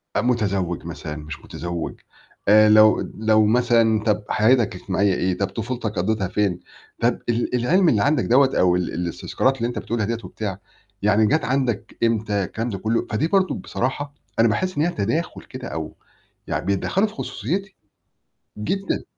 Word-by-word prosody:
أ - - +2
متزوج 100 -9 -1
مثلًا 80 -2 -6
مش 75 +1 -8
متزوج، 85 -1 -5 0.5
آآ 110 +1 +7
لو 110 0 +6 0.2
لو 110 0 +3
مثلًا 115 -1 +3
طب 105 -1 +1
حياتك 115 -2 +3
الاجتماعية 95 +2 0
إيه 90 0 0
طب 100 - 0
طفولتك 115 0 -4
قضّيتها 100 0 0
فين؟ 95 -3 0 0.4
طب 120 +1 +2
ال 120 +1 0
العلم 165 +9 +3
اللي 105 -7 +2
عندك 145 -3 +2
دوّة 135 +2 +4
أو 90 -1 +4
ال 90 -1 -2
الاستذكارات 90 +9 -1
اللي 115 -1 -1
أنت 120 - -4
بتقولها 115 -2 -2
ديّة 115 +2 -1
وبتاع، 100 -4 -5 0.4
يعني 105 +1 +3
جات 155 -3 +1
عندك 130 -4 -1
إمتى 110 -3 +1
الكلام 115 +6 -3
ده 100 - -4
كلّه، 110 +4 -1
فدي 120 +9 +1
برضه 190 0 +2
بصراحة 140 +3 -3 0.3
أنا 115 - +6
باحس 185 - -1
إن 150 - +3
هي 170 - +2
تداخل 150 +9 -2
كده، 130 -1 -8
أو 80 -1 -5 0.5
يعني - - -2
بيتدخّلوا 135 - +1
في 210 - -11
خصوصيّتي 190 - -4 0.8
جدًا. 195 - -2
110 Hz, 165 wpm, -22 LUFS, 100-125 Hz, 0.8 s, آآ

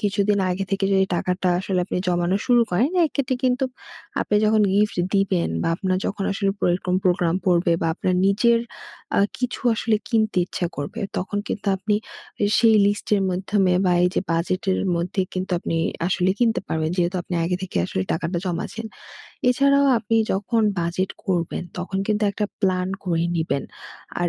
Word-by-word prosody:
কিছুদিন 205 0 +1
আগে 185 +2 -2
থেকে 195 0 0
যদি 190 0 +4
টাকাটা 180 +1 -1
আসলে 190 0 -1
আপনি - - -3
জমানো 175 +1 +1
শুরু 240 -2 +5
করেন, 225 - +2
এইক্ষেত্রে 280 -4 -1
কিন্তু 255 +1 +2 0.6
আপনি 210 - +1
যখন 215 0 +4
গিফট 210 +1 +2 0.2
দিবেন 195 -3 +1
বা, - - 0
আপনার 185 -1 0
যখন 200 -1 -3
আসলে 195 0 0
পর - - 0
এইরকম 180 0 -2
প্রোগ্রাম 175 -1 +2
পড়বে 175 -1 +3
বা, 165 - +1
আপনার 185 +1 0
নিজের 230 +4 +4 0.6
আ - - +5 0.2
কিছু 250 -1 -3
আসলে 220 0 +1
কিনতে 220 -5 +1
ইচ্ছা 180 - -2
করবে, 145 +11 -5 0.2
তখন 195 +3 -2
কিন্তু 210 0 -4
আপনি 205 +2 -1 0.5
আ - - +5
সেই 225 -2 +5
লিস্টের 205 0 +1
মাধ্যমে 185 0 +1
বা, 180 - +3
এইযে 180 - +1
বাজেটের 185 +4 0 0.2
মধ্যে 180 +3 -1
কিন্তু 185 +1 -3
আপনি 165 - -3 0.3
আসলে 180 0 +1
কিনতে 230 -2 +2
পারবেন। 160 0 -1
যেহেতু 175 +1 0
আপনি 180 - -5
আগে 180 +2 0
থেকে 190 - -6
আসলে 95 - -2
টাকাটা 170 +2 -2
জমাচ্ছেন। 185 +6 -4 0.6
এছাড়াও 280 +2 +4
আপনি 225 +1 -1 0.2
যখন 215 +4 0 0.2
বাজেট 170 +3 -1 0.2
করবেন, 175 -3 -1 0.2
তখন 190 +2 -3
কিন্তু 215 0 0
একটা 210 - -2 0.2
প্ল্যান 185 -2 +1 0.2
করে 170 -2 0
নিবেন। 140 -4 -1 0.6
আর 175 - +2
190 Hz, 170 wpm, -23 LUFS, 180-215 Hz, 0.6 s, শুরু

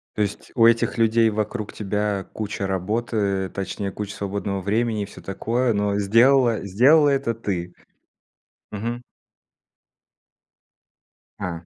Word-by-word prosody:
То 105 - +1
есть 100 - -5
у 115 - +5
этих 115 +1 +3
людей 115 0 +4
вокруг 110 0 -3
тебя 105 -1 -2
куча 100 -2 -3
работы, 100 0 -1
точнее 100 +1 -4
куча 105 +1 -6
свободного 100 -1 -3
времени 110 +2 0
и - - -4
всё 100 - -13
такое, 115 +5 -1
но 100 0 0
сделала 115 +2 +4
сделала 135 - +5
это 135 -4 0
ты? 90 -5 -4 1.0
Мгм. 115 +4 -4 2.4
А, 85 -1 -5
105 Hz, 120 wpm, -23 LUFS, 100-115 Hz, 2.4 s, у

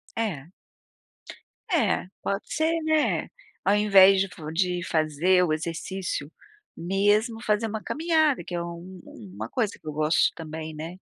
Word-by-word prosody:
É. 185 -11 -3 1.2
Eh, - - +1 0.2
pode 200 +1 -2
ser, 325 +1 +1
né, 315 -1 +1 0.4
ao 200 - +4
invés 195 -2 +6
de 195 - 0 0.3
de 180 +1 0
fazer 160 +4 +2
o 170 - 0
exercício 165 0 -3 0.4
mesmo 205 +6 +1
fazer 215 0 +1
uma 220 0 -5
caminhada 315 -3 +1
que 175 - -6
é 170 - -1
uma 170 0 -6 0.6
uma 110 +2 -5
coisa 220 -5 -1
que - - -30
eu 155 - -4
gosto 155 +2 +2
também, 160 -1 -7
né. 160 +4 -7
190 Hz, 140 wpm, -26 LUFS, 160-215 Hz, 1.2 s, invés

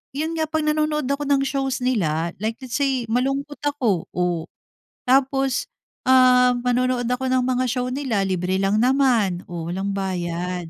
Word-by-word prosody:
yun 315 +3 -2
nga 315 -1 -1
pag 315 0 -1
nanonood 305 -1 0
ako 280 +1 -1
ng 280 -1 +3
shows 270 -1 -1
nila 170 -10 0
like 220 +2 -2
let's 250 -2 -5
say 270 -3 +1
malungkot 275 +4 -1
ako. 250 - 0
Oh, 175 -2 -1 0.6
tapos, 270 +1 +2 0.4
ah, 250 -1 +6
manonood 250 0 +1
ako 250 +2 -1
ng 255 -1 +2
mga 255 0 +1
show 250 0 -1
nila 255 -8 -1
libre 185 0 -1
lang 195 +2 +2
naman, 245 -9 +2
oh, 170 -2 -6
walang 195 +2 -2
bayad, 180 -2 -3
250 Hz, 155 wpm, -22 LUFS, 190-275 Hz, 0.6 s, ah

